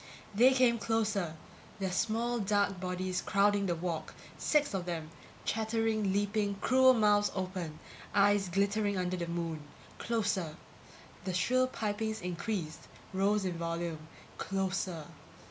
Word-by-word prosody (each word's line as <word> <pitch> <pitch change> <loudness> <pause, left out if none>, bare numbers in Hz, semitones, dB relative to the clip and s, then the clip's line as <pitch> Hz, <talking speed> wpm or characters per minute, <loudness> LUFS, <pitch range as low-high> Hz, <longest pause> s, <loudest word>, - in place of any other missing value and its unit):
They 245 +6 +6
came 250 -3 +4
closer, 210 -6 0 0.4
their 190 -2 -2
small 235 +5 0
dark 200 -2 +1
bodies 185 0 -2
crowding 200 0 +2
the 175 - +1
walk, 170 -1 -4 0.2
six 295 -4 +1
of 185 -2 -2
them, 165 -3 -4 0.3
chattering, 220 -2 0
leaping, 205 +1 0
cruel 260 +5 +5
mouths 205 -2 +4
open, 185 -4 -4 0.4
eyes 200 -1 +4
glittering 200 +2 +1
under 180 0 -1
the 170 -1 -3
moon. 170 -2 -3 0.4
Closer. 205 -8 -1 0.7
The 185 -2 -2
shrill 255 +8 +3
pipings 220 -2 -2
increased, 175 -2 -4 0.3
rose 200 +1 +2
in 175 -2 -2
volume. 165 -2 -3 0.3
Closer. 190 -4 -2
200 Hz, 125 wpm, -32 LUFS, 180-215 Hz, 0.7 s, They